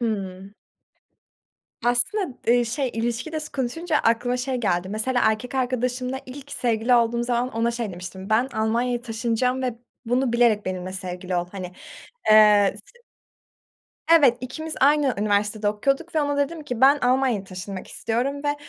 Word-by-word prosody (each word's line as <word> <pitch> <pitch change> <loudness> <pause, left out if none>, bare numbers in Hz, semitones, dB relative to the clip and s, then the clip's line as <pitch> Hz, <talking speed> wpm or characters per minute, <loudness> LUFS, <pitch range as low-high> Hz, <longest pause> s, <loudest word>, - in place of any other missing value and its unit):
Hıı. 195 -4 -3 1.3
Aslında, 250 - 0
eee, 240 +1 +4
şey, 260 +3 -2
ilişki 235 +6 -2
de 315 - -2
s 305 - -8
konuşunca 300 +5 -1
aklıma 245 +1 +1
şey 255 +1 -2
geldi. 185 -6 0
Mesela, 230 +5 0
erkek 220 +4 0
arkadaşımla 255 0 -1
ilk 275 +2 -10
sevgili 235 0 +1
olduğum 235 0 +2
zaman 245 +1 -1
ona 230 +1 +1
şey 235 -3 -4
demiştim, 185 +2 -8
"Ben 230 +4 +3
Almanya'ya 235 +3 0
taşınacağım 240 +2 -1
ve 250 -3 -2 0.3
bunu 245 +1 +1
bilerek 235 -3 +3
benimle 185 0 -4
sevgili 185 -1 -5
ol." 175 0 0
Hani, 185 -3 -6 0.6
eee, 210 -2 +6
s 480 0 -23 1.1
Evet, 275 -7 +6
ikimiz 310 +5 -5
aynı 285 -1 +4
üniversitede 205 0 0
okuyorduk 275 +11 -1
ve 310 - +3
ona 285 0 -1
dedim 305 +3 -1
ki, 250 -4 -5
"Ben 275 +2 +7
Almanya'ya 250 -4 +1
taşınmak 185 0 -7
istiyorum 265 +6 -2
ve 290 0 0
240 Hz, 150 wpm, -24 LUFS, 215-260 Hz, 1.3 s, Ben